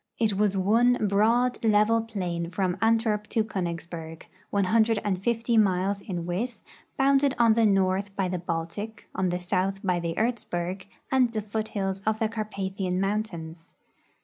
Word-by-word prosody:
It 220 -3 +2
was 200 -1 +1
one 230 +6 +4
broad, 230 +6 +2
level 220 +1 +4
plain 180 -7 -3
from 185 0 -1
Antwerp 225 -2 +2
to 225 - +1
Konigs 170 -6 -3
berg, 165 -2 -8 0.2
150 220 +2 +1
miles 195 0 +1
in 175 -4 -4
width, 215 +8 -3 0.3
bounded 275 0 +3
on 230 -2 +5
the 225 0 +4
north 195 0 +1
by 195 -2 0
the 180 0 -2
Baltic, 175 +6 -5
on 185 -1 0
the 175 - -1
south 190 +2 -1
by 180 -3 +1
the 170 -1 -3
Erzberg 190 -5 -2 0.2
and 255 -3 +3
the 215 - -1
foothills 205 -2 -3
of 220 0 +2
the 220 -1 0
Carpathian 195 -4 -3
mountains. 185 -5 -3
200 Hz, 150 wpm, -26 LUFS, 185-225 Hz, 0.3 s, on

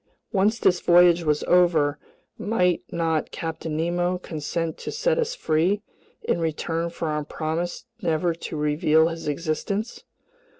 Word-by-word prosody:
Once 210 +2 +2
this 180 -5 +3
voyage 175 0 +5
was 150 -2 +1
over, 160 -5 +3 0.4
might 180 -5 +1
not 165 -2 0
Captain 160 -1 -4
Nemo 175 +2 0
consent 165 -1 -3
to - - -5
set - - +1
us 475 +1 -1
free 185 - +1 0.4
in - - 0
return 165 +1 -1
for 170 -1 -4
our 150 0 -1
promise 165 +7 -3 0.2
never 165 +1 +1
to 165 -1 -6
reveal 150 +2 +3
his 165 -2 -6
existence? 170 +8 -2
170 Hz, 135 wpm, -24 LUFS, 155-180 Hz, 0.4 s, voyage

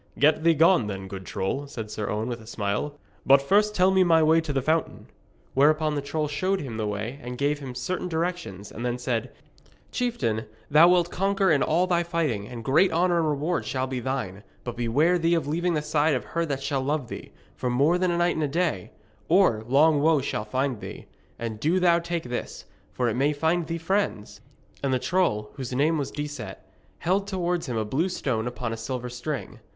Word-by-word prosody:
'Get 150 +2 +3
thee 165 -1 +5
gone, 165 - +4
then, 95 -2 -5
good 95 -1 -8
troll,' 135 +10 -2
said 115 -6 -7
Sir 105 -2 -3
Owen, 110 +2 -2
with 120 -2 -4
a 110 - -14
smile. 110 +6 -2 0.3
'But 135 0 +6
first 210 +9 +2
tell 185 +1 +4
me 190 -1 +5
my 165 -2 +4
way 160 +1 +4
to 160 -2 -4
the 135 - +1
fountain.' 160 +3 -1 0.5
Whereupon 155 +2 +3
the 145 - -1
troll 150 +2 -2
showed 185 +7 0
him 125 -6 -5
the 110 -1 -1
way 105 +6 -4
and 125 +1 -6
gave 145 +2 0
him 130 -3 -7
certain 180 +9 -3
directions, 165 - -3
and 120 - -7
then 120 0 -1
said: 125 -1 -2 0.6
'Chieftain, 120 - -1 0.3
thou 155 +4 +8
wilt 175 -1 +3
conquer 195 -1 +1
in 145 -3 +3
all 170 +4 +2
thy 175 -2 +2
fighting, 160 - -1
and 120 -1 -8
great 150 - +4
honour 175 +1 +2
and 160 -2 +1
reward 150 +4 -1
shall 130 -1 -2
be 130 -1 -3
thine. 120 -7 -3 0.2
But 120 -1 -5
beware 145 +10 +2
thee 165 +1 +2
of 165 -4 0
leaving 170 +3 0
the 150 - -1
side 150 0 +2
of 125 - -3
her 170 0 -2
that 135 -2 -3
shall 140 -1 -1
love 145 -1 -1
thee, - - -8 0.2
for 125 - -2
more 145 +8 +3
than 185 0 +2
a 170 - 0
night 175 0 +2
and 160 - -1
a - - +1
day, 155 - -1 0.4
or 165 - +4
long 145 +3 +4
woe 155 0 +4
shall 120 -5 -3
find 130 +1 -1
thee. - - -8 0.3
And 115 -2 -5
do 165 +9 +2
thou 170 -2 +4
take 170 0 -3
this, 125 0 -5 0.3
for 125 - -1
it 115 - +1
may 140 +4 +2
find 160 +3 0
thee 165 - -2
friends.' 165 - -2 0.4
And 140 - 0
the 130 - +3
troll, 120 - 0
whose 130 -3 -5
name 150 +5 +2
was 140 - -2
Decet, 145 -9 -5 0.4
held 195 +3 0
towards 180 -4 -1
him 120 -3 -2
a 110 - 0
blue 150 - 0
stone 120 -10 -2
upon 120 -1 -4
a - - -5
silver 125 +2 -4
string. 125 0 -5
145 Hz, 215 wpm, -26 LUFS, 120-170 Hz, 0.6 s, thou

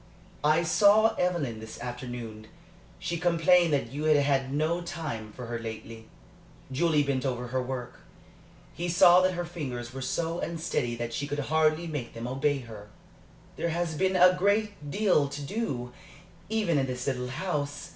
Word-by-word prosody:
"I 155 +3 +4
saw 210 +5 +5
Evelyn 160 -11 0
this 110 0 -9
afternoon. 120 -3 -6 0.5
She 170 -1 -3
complained 175 0 +4
that 135 -5 0
you 145 +3 -4
had 155 -1 +5
had 135 -2 +1
no 155 +4 0
time 145 -11 -5
for 125 - -8
her 120 0 -4
lately." 115 0 -8 0.6
Julie 150 +2 +2
bent 140 -2 -1
over 125 -2 -2
her 130 +1 0
work. 125 -1 -5 0.7
He 175 +1 -3
saw 175 +1 +7
that 185 0 +2
her 175 0 -2
fingers 130 -8 -5
were 135 - -6
so 165 +6 -2
unsteady 155 -7 -2
that 120 0 -4
she 145 - -2
could 145 0 -3
hardly 155 +3 +2
make 150 -7 -5
them 115 +1 -5
obey 135 +2 0
her. 110 -4 -10 0.7
"There 170 - -1
has 170 0 -1
been 190 +4 +1
a 180 0 +6
great 200 -4 0
deal 185 -5 +2
to 140 +1 -6
do, 140 - -3 0.6
even 210 -9 +1
in 135 - 0
this 125 -1 -4
little 125 -2 -1
house. 145 0 -3
145 Hz, 165 wpm, -28 LUFS, 125-170 Hz, 0.7 s, saw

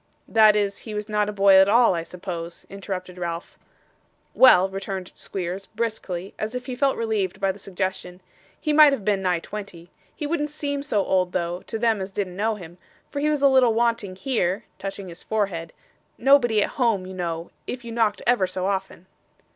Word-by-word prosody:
'That 215 -1 +6
is, 200 -1 0
he 215 -2 -8
was 210 0 -4
not 210 -1 0
a - - -1
boy 200 -1 +5
at 190 +1 +6
all, 235 -1 +5
I 170 - -1
suppose?' 170 0 -7
interrupted 185 -2 -6
Ralph. 170 -1 -5 0.8
'Well,' 195 -8 +7
returned 195 -1 -5
Squeers, 190 +1 -5
briskly, 205 -5 -4
as 215 +3 -3
if 250 0 -4
he 255 - -5
felt 275 +1 +1
relieved 210 -5 -1
by 195 -1 +1
the 195 - -12
suggestion, 185 -1 -4 0.4
'he 305 - 0
might 300 -1 +8
have 215 -8 -4
been 205 -2 +1
nigh 180 -2 +1
twenty. 175 -2 -8 0.2
He 300 - -4
wouldn't 295 -1 -1
seem 285 -1 -3
so 215 -9 0
old, 185 -1 +1
though, 175 0 -2
to 225 - -3
them 225 -3 +1
as 190 - -4
didn't 195 -2 -4
know 215 +3 0
him, 175 -3 -11 0.3
for 285 - -3
he 300 +1 +1
was 295 -2 0
a - - +8
little 255 -4 +4
wanting 230 -5 0
here,' 200 -3 -1 0.2
touching 195 0 -6
his 170 -1 -10
forehead; 195 -7 -2 0.5
'nobody 240 -5 +4
at - - -2
home, 220 -6 +2
you 190 - -8
know, 170 -2 -4 0.2
if 250 -1 -5
you 230 - -6
knocked 225 -3 0
ever 240 -6 +3
so 185 0 -3
often. 190 -2 -3
200 Hz, 195 wpm, -24 LUFS, 185-230 Hz, 0.8 s, might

